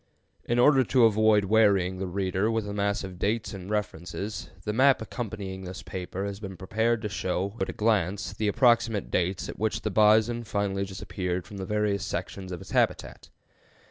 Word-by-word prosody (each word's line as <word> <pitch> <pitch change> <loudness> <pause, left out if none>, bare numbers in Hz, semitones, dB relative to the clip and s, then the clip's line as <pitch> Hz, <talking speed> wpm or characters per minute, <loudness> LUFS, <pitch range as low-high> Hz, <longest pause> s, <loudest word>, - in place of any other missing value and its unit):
In 120 - 0
order 135 +2 +6
to 125 0 +4
avoid 110 -1 +4
wearying 100 -3 +3
the 95 - -2
reader 95 +2 0
with 115 -2 -1
a 100 - -4
mass 100 0 0
of 95 -2 -8
dates 105 +1 -1
and 95 -1 -8
references, 100 0 -4
the 105 - -2
map 135 +4 +5
accompanying 100 -5 -5
this 90 0 -7
paper 95 +1 -5
has 100 0 -5
been 95 -3 -7
prepared 110 +4 0
to - - 0
show 95 0 -2
at 95 - 0
a - - -4
glance 105 -2 0
the 110 - -2
approximate 115 -2 +2
dates 90 +1 0
at - - -8
which 110 0 -1
the 110 - -1
bison 110 +3 +4
finally 100 -2 -1
disappeared 90 -2 -4
from 100 - -10
the 95 - -4
various 105 -2 0
sections 95 -2 -5
of 90 - -6
its - - -11
habitat. - - 0
100 Hz, 185 wpm, -27 LUFS, 95-110 Hz, -, order